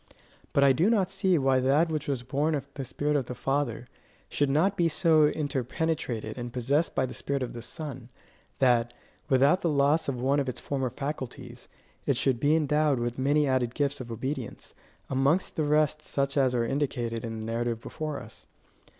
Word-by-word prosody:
But 140 - +3
I 135 -1 +6
do 170 +11 +3
not 195 -5 +2
see 190 -2 +2
why 135 -2 +3
that 140 +6 +3
which 155 0 -3
was 135 -4 -2
born 145 +5 0
of 140 -1 -4
the 140 - -5
spirit 145 +4 -1
of 135 -3 +1
the 125 - -5
Father, 135 -2 -1 0.4
should 145 -1 +1
not 170 +8 +2
be 170 -3 +2
so 160 -1 +4
inter 145 -3 -1
penetrated 125 -6 -3
and 120 0 -5
possessed 135 +7 0
by 130 - +2
the 130 - -7
spirit 140 -1 -2
of 125 - -5
the 120 - -7
Son, 130 -3 -7 0.5
that, 120 -2 +3 0.4
without 140 +7 +4
the 170 - +1
loss 145 +1 +2
of 130 -3 -3
one 135 +3 +2
of 135 -2 -1
its 125 - -5
former 135 -3 -2
faculties, 140 0 -6 0.4
it - - +2
should 130 -3 +1
be 145 +4 +3
endowed 150 -2 +2
with 120 +1 -3
many 145 +3 +3
added 130 -2 0
gifts 145 -1 0
of 120 -2 -8
obedience; 130 +1 -5 0.3
amongst 140 +7 +1
the 155 - 0
rest 150 0 +2
such 140 -2 -2
as 130 -3 +2
are 120 -1 +1
indicated 120 -4 -2
in 115 -1 -4
the 110 - -5
narrative 115 0 -2
before 155 +4 -5
us. 115 -3 -12
140 Hz, 195 wpm, -28 LUFS, 125-150 Hz, 0.5 s, I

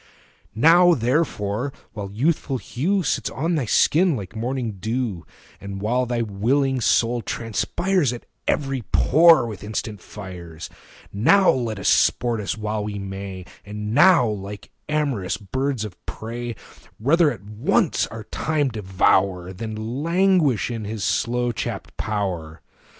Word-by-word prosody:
Now 170 +7 +6
therefore, 125 -2 0 0.2
while 105 -3 -5
the 100 - -12
youthful 140 +1 0
hue 180 +11 -1
Sits - - -1
on 165 +6 -2
thy 150 -6 0
skin 165 - +3
like 100 -2 -7
morning 120 -2 -3
dew, 110 -4 -3 0.3
And 100 0 -7
while 120 +5 0
thy 120 -1 0
willing 125 +6 0
soul 120 +1 +2
transpires 145 - -1
35 120 - -2 0.3
At - - +5
every 135 -3 -2
pore 160 -2 +6
with 105 -5 -7
instant 105 -1 -4
fires, 90 -5 -9 0.4
Now 185 - +5
let 115 -4 -2
us 100 - -3
sport 120 -3 +3
us 105 - -3
while 105 0 -2
we 105 -1 -4
may, 95 -1 -6 0.2
And 105 +1 -5
now, 165 0 +6
like 100 -1 -6 0.2
amorous 140 -11 -1
birds 130 +3 -2
of 95 -4 -11
prey, 120 +1 -5 0.4
Rather 150 +6 +4
at 95 - -8
once 105 +2 +1
our 115 -1 -8
time 150 +5 -1
devour 95 -3 +1
Than 110 +5 -5
languish 170 - +2
in 115 -2 -4
his 105 0 -4
slow 120 +1 0
chapt 115 - -5
power. 90 -8 -3
115 Hz, 140 wpm, -23 LUFS, 105-135 Hz, 0.4 s, Now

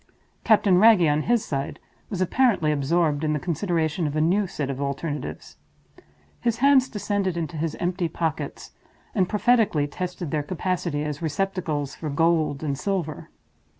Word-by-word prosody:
Captain 205 -4 +4
Wragge, 215 -4 +6
on 150 +1 +2
his 235 +4 +1
side, 140 +1 -3 0.3
was 190 -4 -3
apparently 190 -5 +2
absorbed 150 +1 +1
in 155 -1 +1
the 150 - -1
consideration 165 -1 -1
of 145 - -4
a - - +1
new 185 +6 +2
set 145 -5 -3
of 135 +1 -5
alternatives. 145 +2 -4 0.8
His 235 -2 0
hands 265 0 +4
descended 200 -4 -1
into 165 -1 -3
his 160 0 -2
empty 175 -1 -1
pockets, 160 -1 -4 0.4
and 185 -5 +1
prophetically 215 -8 +2
tested 180 +1 -5
their 155 -2 0
capacity 170 -1 -2
as 150 0 -4
receptacles 160 -4 -2
for 155 +1 -5
gold 155 -1 +1
and 140 -3 -1
silver. 180 -4 -3
165 Hz, 150 wpm, -24 LUFS, 150-195 Hz, 0.8 s, Wragge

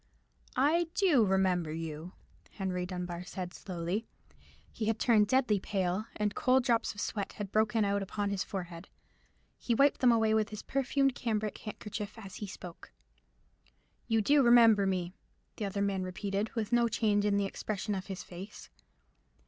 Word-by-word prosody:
"I 315 +6 +3
do 335 - +4
remember 185 -4 +1
you," 160 +2 -6 0.4
Henry 180 -2 -3
Dunbar 180 -1 -5
said 180 0 -6
slowly. 185 +4 -4 0.6
He 220 - -4
had 225 0 +1
turned 220 -3 +4
deadly 245 -4 +2
pale, 190 +2 -1
and 210 -1 -1
cold 255 0 +3
drops 230 -2 +1
of - - -9
sweat 200 -2 -3
had 205 -2 -6
broken 215 0 +2
out 200 0 0
upon 200 +1 -2
his 200 -1 -1
forehead: 175 -2 -7 0.7
he 235 - 0
wiped 280 +3 +3
them 250 -2 +6
away 220 -1 +3
with 220 -1 +2
his 215 -1 -7
perfumed 275 0 +1
cambric 215 -3 -2
handkerchief 210 0 -6
as 195 -4 -9
he 205 - -5
spoke. 180 -2 -10 1.2
"You 225 -1 +2
do 285 +5 +5
remember 230 -5 +6
me?" 180 -2 -1 0.4
the 210 - -2
other 200 0 -1
man 195 -2 0
repeated, 195 +3 -2
with 225 0 -2
no 240 0 +4
change 210 -3 +1
in 205 -1 +2
the 200 - +1
expression 210 +1 -3
of 190 -1 -4
his 190 -2 -6
face. 185 +4 -10
205 Hz, 165 wpm, -31 LUFS, 190-225 Hz, 1.2 s, them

